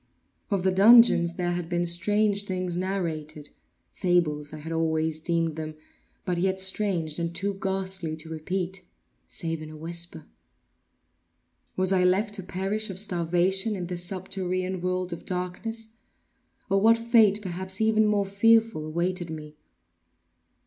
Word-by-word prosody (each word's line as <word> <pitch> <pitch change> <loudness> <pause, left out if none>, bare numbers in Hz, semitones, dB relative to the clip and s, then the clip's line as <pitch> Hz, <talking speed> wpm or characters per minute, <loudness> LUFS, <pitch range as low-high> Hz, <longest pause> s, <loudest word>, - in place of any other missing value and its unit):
Of 195 -3 0
the 190 - +3
dungeons 195 -4 +6
there 175 -1 -1
had 175 -1 -3
been 175 0 0
strange 205 +4 +1
things 185 -2 -2
narrated—fables 160 -2 -3
I 155 - -7
had 155 +2 -8
always 160 -1 0
deemed 165 -1 -1
them—but 155 +3 -7
yet 190 +1 0
strange, 190 -5 +1
and 170 0 -3
too 200 +4 -1
ghastly 190 -4 -1
to 160 +1 -8
repeat, 180 +4 -3 0.5
save 165 -1 -3
in 155 - -8
a 155 - -10
whisper. 170 0 -3 1.5
Was 185 0 +3
I 185 -1 +3
left 195 +3 +2
to 205 - -3
perish 195 +4 -3
of 190 - -6
starvation 190 +2 +1
in 180 -2 -4
this 175 0 -3
subterranean 185 0 -2
world 185 0 -2
of 170 - -8
darkness; 200 +5 -4 0.8
or 195 0 +2
what 225 +2 +6
fate, 230 -3 +4
perhaps 190 +1 -3
even 220 -1 +3
more 205 -1 +2
fearful, 220 -4 +3
awaited 175 +2 0
me? 155 -1 -8
180 Hz, 135 wpm, -26 LUFS, 170-195 Hz, 1.5 s, dungeons